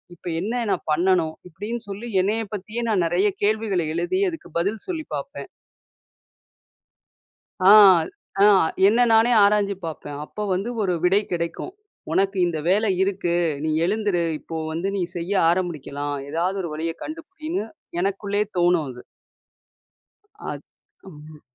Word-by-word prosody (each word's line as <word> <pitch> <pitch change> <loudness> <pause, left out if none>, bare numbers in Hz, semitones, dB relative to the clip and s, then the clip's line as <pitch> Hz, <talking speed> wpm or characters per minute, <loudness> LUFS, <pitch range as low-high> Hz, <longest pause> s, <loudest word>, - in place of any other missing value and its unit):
இப்ப 175 - -13
என்ன 235 +6 -2
நான் - - -2
பண்ணணும்? 170 0 +2
இப்டின்னு 205 +8 -5
சொல்லி 205 +4 -6
என்னய 215 +4 0
பத்தியே 215 +4 -4
நான் 200 -5 +2
நெறைய 175 +5 +2 0.2
கேள்விகள 210 -3 +1
எழுதி 175 - 0
அதுக்கு 325 - -9
பதில் 200 +5 -2
சொல்லி 335 -4 -3
பாப்பேன். 140 -1 -7 2.1
ஆ, 190 +2 +7 0.7
ஆ. - - +8 0.4
என்ன 220 +4 +3
நானே 225 +2 +5
ஆராய்ஞ்சு 200 -1 +3
பாப்பேன். 145 -3 -6
அப்போ 210 - -6
வந்து 195 +6 -2
ஒரு 190 -3 +1
விடை 190 +3 +4
கிடைக்கும். 170 - -3 0.4
உனக்கு 195 0 +1
இந்த 170 -2 -2
வேலை 210 +4 +3
இருக்கு, 190 -3 0 0.3
நீ 160 - 0 0.2
எழுந்துரு, 205 -2 0 0.2
இப்போ 165 - -8 0.2
வந்து 165 +4 -2
நீ - - -1
செய்ய 175 +3 -3 0.2
ஆரமுடிக்கலாம். 150 -5 -2
ஏதாவது 175 +5 -1
ஒரு 170 - -4
வழிய 165 +2 -3
கண்டுபிடின்னு, 320 - -5 0.3
எனக்குள்ளேயே 200 +2 -1
தோணும் 175 -3 +3
அது. 125 -1 -10 1.5
அத் - - -8 0.5
ம். 150 0 -13
190 Hz, 130 wpm, -23 LUFS, 170-210 Hz, 2.1 s, ஆ